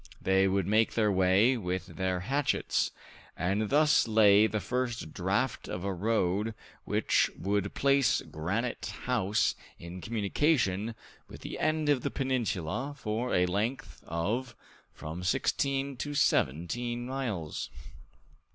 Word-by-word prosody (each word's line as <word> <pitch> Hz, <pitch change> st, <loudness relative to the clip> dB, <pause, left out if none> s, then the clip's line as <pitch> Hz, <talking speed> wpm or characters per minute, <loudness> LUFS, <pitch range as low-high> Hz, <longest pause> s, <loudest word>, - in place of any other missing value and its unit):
They 95 Hz, 0 st, +3 dB
would 95 Hz, -1 st, +1 dB
make 110 Hz, +3 st, +2 dB
their 110 Hz, -2 st, +3 dB
way 95 Hz, +6 st, +4 dB
with 90 Hz, -3 st, -3 dB
their 90 Hz, +1 st, -2 dB
hatchets, 135 Hz, +8 st, 0 dB, 0.5 s
and 100 Hz, +5 st, 0 dB
thus 150 Hz, -2 st, +4 dB
lay 105 Hz, -1 st, +6 dB
the 110 Hz, -, -2 dB
first 120 Hz, -3 st, -3 dB
draft 100 Hz, +8 st, -1 dB
of 90 Hz, -, -5 dB
a 100 Hz, 0 st, -1 dB
road 105 Hz, +2 st, 0 dB, 0.3 s
which -, -, +2 dB
would 100 Hz, +1 st, -1 dB
place 140 Hz, -3 st, +3 dB
Granite 100 Hz, +10 st, -3 dB, 0.2 s
House 110 Hz, -5 st, +1 dB, 0.2 s
in 85 Hz, +2 st, -9 dB
communication 110 Hz, -, 0 dB, 0.3 s
with -, -, -12 dB
the -, -, -6 dB
end 155 Hz, 0 st, +1 dB
of 145 Hz, -3 st, +3 dB
the -, -, -1 dB
peninsula 130 Hz, -, -2 dB
for 115 Hz, +1 st, -2 dB
a 90 Hz, -, +4 dB
length 110 Hz, +10 st, -3 dB
of 110 Hz, +10 st, -2 dB, 0.4 s
from 80 Hz, +3 st, -7 dB
sixteen 135 Hz, +6 st, 0 dB
to 145 Hz, +3 st, -4 dB
seventeen 120 Hz, -, 0 dB
miles. 120 Hz, -, -4 dB
110 Hz, 125 wpm, -30 LUFS, 95-125 Hz, 0.5 s, lay